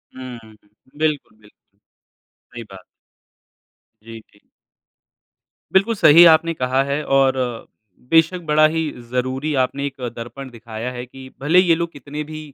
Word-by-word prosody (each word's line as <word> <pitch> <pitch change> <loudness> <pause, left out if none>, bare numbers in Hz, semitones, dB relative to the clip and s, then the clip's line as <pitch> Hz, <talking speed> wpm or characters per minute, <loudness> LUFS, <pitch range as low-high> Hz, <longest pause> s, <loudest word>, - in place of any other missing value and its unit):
हम्म। 120 -4 -10 0.4
बिल्कुल, 150 -8 -2
बिल्कुल। 105 -1 -26 0.7
सही 120 -1 -8
बात 95 - -11
है। - - -22 1.2
जी, 115 0 -10
जी। 105 - -25 1.3
बिल्कुल 205 +4 +2
सही 165 -1 +7
आपने 165 +1 +4
कहा 130 -1 0
है 140 +2 -3
और 135 -1 +3 0.8
बेशक़ 165 +2 +3
बड़ा 155 0 +4
ही 160 +1 -2 0.3
ज़रूरी 130 +4 -2
आपने 140 +2 -4
एक 135 -2 -7
दर्पण 120 +3 -8
दिखाया 115 +1 -7
है 125 0 -7
कि 130 +1 -13
भले 165 +6 +4
ही 185 - +2
ये 165 - +5
लोग 170 0 -3
कितने 145 +2 -7
भी 155 +1 -9
135 Hz, 145 wpm, -20 LUFS, 120-155 Hz, 1.3 s, सही